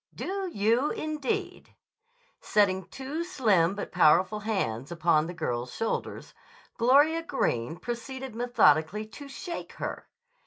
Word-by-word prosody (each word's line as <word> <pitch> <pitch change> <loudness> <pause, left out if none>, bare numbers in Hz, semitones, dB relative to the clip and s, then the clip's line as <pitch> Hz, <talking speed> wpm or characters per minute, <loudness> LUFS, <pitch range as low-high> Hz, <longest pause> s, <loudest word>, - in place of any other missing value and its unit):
"Do 385 0 -3
you, 230 +6 +2
indeed!" 305 -4 -3 0.7
Setting 190 -3 +2
two 280 +5 -5
slim 210 - +2
but 205 - -5
powerful 180 +4 +4
hands 155 - -2
upon 165 -2 +2
the 175 - -6
girl's 125 -6 -3
shoulders, 225 - -3 0.5
Gloria 290 +7 +5
Greene 145 - -1
proceeded 255 +5 -6
methodically 215 -5 +3
to 280 +6 -11
shake 340 +5 -7
her. - - -6
215 Hz, 115 wpm, -28 LUFS, 170-270 Hz, 0.7 s, Gloria